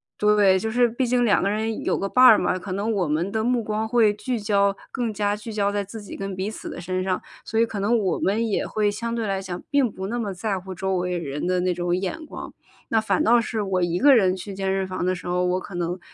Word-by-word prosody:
对， 205 -2 +4
就 220 - -2
是 240 +2 +3
毕 240 +2 -1
竟 245 0 +2
2 205 - +3
个 195 - +1
人 220 +1 -2
有 - - +1
个 195 - -2
伴 255 +5 +3
儿 250 -4 +9
嘛， 185 - 0
可 185 0 -6
能 205 +4 -1
我 195 -6 0
们 160 +6 -1
的 220 0 -1
目 245 0 +1
光 215 +1 -2
会 225 -3 +4
聚 225 +4 -3
焦 200 -1 +2 0.2
更 240 -4 -2
加 205 0 0
聚 215 +2 -8
焦 205 -2 0
在 205 0 -1
自 210 +2 -9
己 200 - -8
跟 195 -1 -5
彼 190 +3 -3
此 - - -8
的 - - -7
身 185 +1 -2
上， 185 -1 0 0.2
所 225 - -2
以 230 - +5
可 220 -3 -6
能 215 +4 +2
我 190 -6 0
们 220 +4 +1
也 210 - -1
会 210 -1 0
相 230 +3 -3
对 230 -1 -2
来 195 -2 -1
讲 180 -2 -6
并 275 -5 +3
不 190 - -6
那 235 +5 -3
么 210 -4 -2
在 195 +1 -2
乎 185 0 -8
周 190 +1 -1
围 180 0 -1
人 150 -1 -4
的 180 0 +1
那 180 0 +1
种 175 0 -1
眼 195 - -4
光。 - - -8 0.4
那 225 - +2
反 195 -4 +1
倒 235 +1 +5
是 225 -2 -2
我 190 -2 0
一 175 0 0
个 280 +7 +6
人 190 -5 +3
去 195 +2 -7
健 195 0 -3
身 190 0 0
房 185 -1 -4
的 185 +1 +1
时 180 - -10
候， 180 0 0
我 180 +1 +1
可 195 - -10
能， 175 +1 -2
200 Hz, 295 characters per minute, -24 LUFS, 185-220 Hz, 0.4 s, 儿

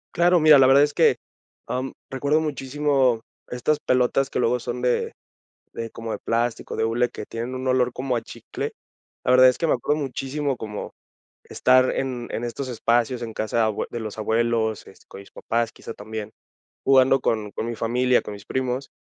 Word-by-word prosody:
Claro, 175 +1 +4
mira, 155 -3 +7
la 130 - +6
verdad 135 +2 +6
es 145 0 0
que, - - +4 0.5
ah, 125 - -2
mm, 135 - -5 0.2
recuerdo 140 +4 +1
muchísimo 140 -4 0 0.3
estas 135 +5 -1
pelotas 130 +2 +1
que - - -4
luego 125 0 +2
son 125 +1 -5
de 125 -1 0 0.6
de 115 0 -5
como 115 0 -6
de - - -3
plástico, 115 0 -2
de 110 - 0
hule, 120 +2 +1
que - - -7
tienen 120 +3 -5
un 130 +1 -5
olor 125 -1 +2
como 130 -1 -2
a 115 - -2
chicle. - - -6 0.5
La - - +1
verdad 130 0 +8
es 125 - +2
que 165 - 0
me - - +2
acuerdo 150 +5 -1
muchísimo 135 +1 -3
como, 105 -2 -6 0.5
estar 130 0 +3
en 125 -3 -3
en 120 - -3
estos 130 +3 -4
espacios, 120 +1 0
en 115 -1 -6
casa 110 +1 -2
de 115 - +4
abue 110 -1 -1
de 120 - -5
los 110 -1 -6
abuelos, 110 0 0
este, - - -17
con - - -10
mis 100 - -15
papás 115 0 -1
quizá 115 - -9
también, 110 0 -7 0.6
jugando 135 0 +5
con 105 -2 -1
con 110 - -4
mi 120 - -3
familia, 125 +3 +2
con 105 - -8
mis 100 -1 -11
primos. 130 +1 -3
125 Hz, 200 wpm, -23 LUFS, 115-135 Hz, 0.6 s, verdad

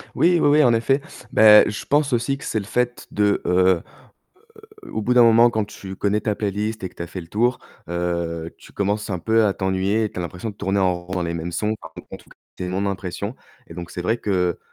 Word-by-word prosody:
Oui, 175 0 +4
oui, - - +4
oui, 150 +1 +5
en 120 -2 +4
effet. 135 +5 +1 0.3
Bah 105 -1 +7
je 105 - -6
pense 145 0 +2
aussi 120 +3 0
que - - -12
c'est 110 - -1
le 100 - -7
fait 120 +2 -2
de, 105 -1 +1
heu 90 -1 +3 1.0
heu, - - -11
au 110 - -2
bout 125 +4 +1
d'un 125 - +7
moment 115 +1 +6
quand 110 -2 -1
tu 95 -2 -9
connais 105 +1 0
ta 105 -2 -1
playlist 105 0 -3
et - - -2
que - - -24
tu - - -7
as 85 - -5
fait 90 +2 -6
le 85 - -11
tour, 120 +7 0 0.3
heu, 85 -1 -3
tu - - -17
commences 105 +1 -2
un 90 - -2
peu 110 +5 +2
à 100 - +2
t'ennuyer 95 +3 0
et 105 - -2
tu - - -8
as - - -2
l'impression 90 +6 -5
de 100 - -14
tourner 100 0 -1
en 95 -2 +2
rond 90 - -9
dans 90 - -1
les 85 0 -3
mêmes 85 +1 -4
sons, 105 +5 -1
enfin, - - -11
en - - -5
tout - - -21
cas, - - -18 0.2
c'est 90 - -4
mon 95 +2 -1
impression, 100 +3 -4 0.3
et 80 - -12
donc 85 -1 -7
c'est 90 - -5
vrai 110 +6 0
que, 90 -4 0
100 Hz, 255 wpm, -22 LUFS, 90-115 Hz, 1.0 s, Bah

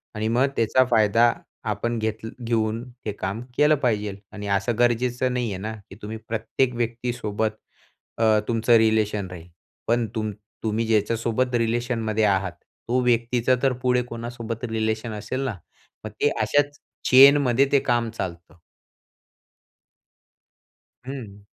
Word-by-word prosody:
आणि 105 +1 -1
मग 120 +4 +3
त्याचा 115 +3 +3
फायदा 115 +1 +5 0.4
आपण 115 +3 -2
घेत 110 0 -3 0.2
घेऊन 115 -1 0 0.2
ते 105 - -1
काम 100 +2 -4 0.2
केलं 150 +1 +5
पाहिजे. 105 -7 0 0.2
आणि 105 -1 -7
असं 100 +3 0
गरजेचं 120 +1 +1
नाही 125 -2 -1
आहे 95 - -4
ना, 110 +2 -4 0.2
की - - -11
तुम्ही 110 +2 -5
प्रत्येक 115 +3 0
व्यक्तीसोबत 115 -2 -2 0.7
अ, 110 -1 +4
तुमचं 115 0 +2
रिलेशन 110 -3 +2
राहील. 85 -2 -10 0.4
पण 120 0 +2
तुम 110 -1 -1 0.3
तुम्ही 110 +1 0
ज्याच्यासोबत 115 +3 +1
रिलेशनमध्ये 115 -2 0
आहात, 95 -2 +1 0.4
तो 125 +2 +2
व्यक्तीचा 120 +1 +2
तर 135 -1 +3
पुढे 125 -1 +3
कोणासोबत 115 0 -5
रिलेशन 110 0 -1
असेल 120 +5 -4
ना, 125 -6 -2 0.5
मग 110 - -5
ते 145 - +4
अशाच 145 0 +1 0.3
चेनमध्ये 135 -1 +7
ते 140 - +5
काम 120 -3 0
चालतं. 90 -6 -6 2.5
हं. 115 -7 -8
115 Hz, 130 wpm, -24 LUFS, 110-120 Hz, 2.5 s, चेनमध्ये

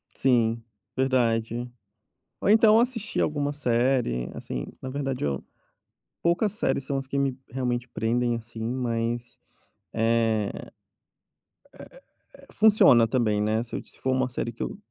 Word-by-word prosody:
Sim, 115 -3 +2 0.3
verdade. 120 -2 0 0.7
Ou - - 0
então 220 +1 +6
assistir 235 -3 -1
alguma 145 -1 0
série, 120 - 0
assim, - - -5
na 130 - -6
verdade 135 - -3
eu 70 -2 -2 0.8
poucas 175 +5 +2
séries 210 - 0
são 140 +1 -2
as 135 -1 -4
que 140 - -3
me 135 -2 0
realmente 125 -1 -2
prendem, 120 +1 0
assim, 115 0 -8
mas, 120 0 -2 0.5
eh 115 -2 +1
eh - - -9 1.7
eh, 275 - -18
funciona 205 - +6
também, 110 -4 +1
né. 110 +2 +1
Se 120 - -8
eu - - -4
se - - -14
for 130 - -1
uma 130 -1 +1
série 120 -1 -3
que 115 - -5
eu - - -5
125 Hz, 140 wpm, -26 LUFS, 115-135 Hz, 1.7 s, então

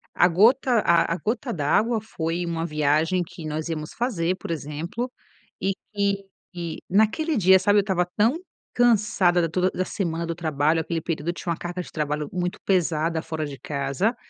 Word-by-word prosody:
A 175 - +5
gota 230 +7 +4
a 170 -3 +3
a - - -5
gota 235 +6 -2
d'água 220 +8 +1
foi 175 -5 -3
uma 165 -1 -2
viagem 155 +3 +1
que 165 -1 -10
nós 155 +1 -3
íamos 155 -2 -4
fazer, 185 -8 0
por 175 - -6
exemplo, 165 - -4 0.5
e 195 - +1 0.2
que 200 -1 0 0.6
naquele 220 - +2
dia, 190 -4 +6
sabe, 205 +2 +4
eu - - +5
estava 190 -3 0
tão 230 +9 +3 0.4
cansada 215 -7 +3
da 165 - 0
toda 185 +3 +1
da 185 - -2
semana 170 -4 -2
do 170 - -3
trabalho, 155 -1 +1
aquele 165 0 -3
período 160 -1 -3
eu - - 0
tinha 170 0 -4
uma 165 - -2
carga 175 +1 -4
de - - -11
trabalho 150 -1 -2
muito 180 0 -2
pesada, 165 -3 +1
fora 160 -1 -3
de 140 -2 -7
casa. 140 - -1
175 Hz, 180 wpm, -24 LUFS, 160-205 Hz, 0.6 s, dia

